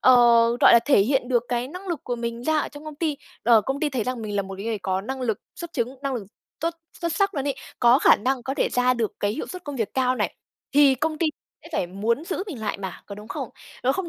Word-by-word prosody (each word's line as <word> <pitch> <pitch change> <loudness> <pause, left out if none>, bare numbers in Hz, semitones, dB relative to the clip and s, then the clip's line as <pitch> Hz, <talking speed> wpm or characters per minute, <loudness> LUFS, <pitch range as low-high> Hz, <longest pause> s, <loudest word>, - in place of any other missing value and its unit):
ờ, 255 - +7 0.5
rọi - - +8
là, 235 - +9
thể 280 -7 +5
hiện 255 +4 +1
được 240 -2 +3
cái 245 +1 -1
năng 365 +4 -8
lực 335 -5 -2
của 245 - -2
mình 235 0 -4
ra 315 +1 +2
ở - - -1
trong 290 +1 -12
công 310 - -7
ty, 305 -2 -1 0.3
ờ, 230 -1 +6
công 270 +6 -3
ty 310 - +2
thấy 245 -5 -1
rằng 250 -2 -3
mình 210 -1 -3
là 200 - +2
một 195 0 -7
cái 200 - -7
người 225 -2 -1
có 190 0 -1
năng 260 +6 -5
lực 225 -5 -1 0.2
xuất 340 -1 -7
chứng, 255 -2 -2
năng 275 -2 -1
lực 215 -6 -4 0.3
tốt, 330 +2 -1 0.3
xuất 340 -2 -1
sắc 395 +2 +1
luôn 275 -1 -2
ấy, 280 - 0 0.2
có 240 +2 +6
khả - - +6
năng 255 +3 -1
có 265 +2 -3
thể - - +1
ra 250 0 +2
được 230 -3 -1
cái 205 0 +1
hiệu 280 - -4
suất 365 -2 -8
công 290 -2 -5
việc 225 -4 -2
cao 255 -1 +2
này, - - -1 0.4
thì 285 -1 +6
công 310 +4 -2
ty 330 - +2 0.4
sẽ 325 - -12
phải 180 - 0
muốn 220 - -1
giữ 370 +2 -2
mình 300 - -6
lại 210 -2 -2
mà, 190 -2 -6
có 200 - -7
đúng 210 +2 -11
không? - - -4 0.3
Nó 260 +2 +3
không 370 +1 -3
255 Hz, 285 wpm, -24 LUFS, 225-295 Hz, 0.5 s, là